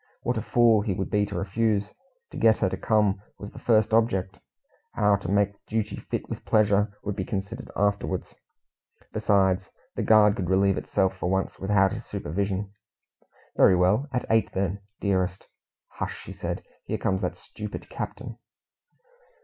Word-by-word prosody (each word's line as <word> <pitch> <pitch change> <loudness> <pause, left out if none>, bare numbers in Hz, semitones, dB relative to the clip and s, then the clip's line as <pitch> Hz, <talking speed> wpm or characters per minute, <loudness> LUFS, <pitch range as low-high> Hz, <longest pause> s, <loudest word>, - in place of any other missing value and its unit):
What 125 - 0
a 110 - -1
fool 115 -1 +4
he 100 -3 -1
would 95 0 -3
be 105 -1 +2
to 100 - -5
refuse. 105 +1 0 0.4
To - - -11
get 110 -1 +5
her 95 - +1
to 95 - -3
come 105 -1 +1 0.2
was 100 - -8
the - - -11
first 110 -2 +3
object; 95 -5 +1 0.5
how 105 -1 +3
to 100 -3 -6
make 100 0 +1
duty 110 -1 -1
fit - - -4
with - - -6
pleasure 105 -1 +2
would 105 -1 -3
be 95 - -2
considered 100 +6 -5
afterwards. 100 -2 -1 0.8
Besides, 95 -2 +2 0.3
the - - -2
guard 105 -2 +5
could 90 -3 -2
relieve 95 0 +3
itself 95 0 0
for 90 - -2
once 95 +1 -1
without 95 -1 +3
his - - -5
supervision. 100 +5 -3 0.8
"Very 95 - +6
well, 95 +10 +2
at 125 - -1
eight 110 0 +3
then, 95 +1 -1 0.2
dearest." 95 -2 0 0.4
"Hush!" - - -6
said - - -4
she. - - -33 0.2
"Here - - +1
comes 95 -1 0
that - - -2
stupid 105 -1 -8
captain." - - -6
100 Hz, 165 wpm, -26 LUFS, 95-105 Hz, 0.8 s, Very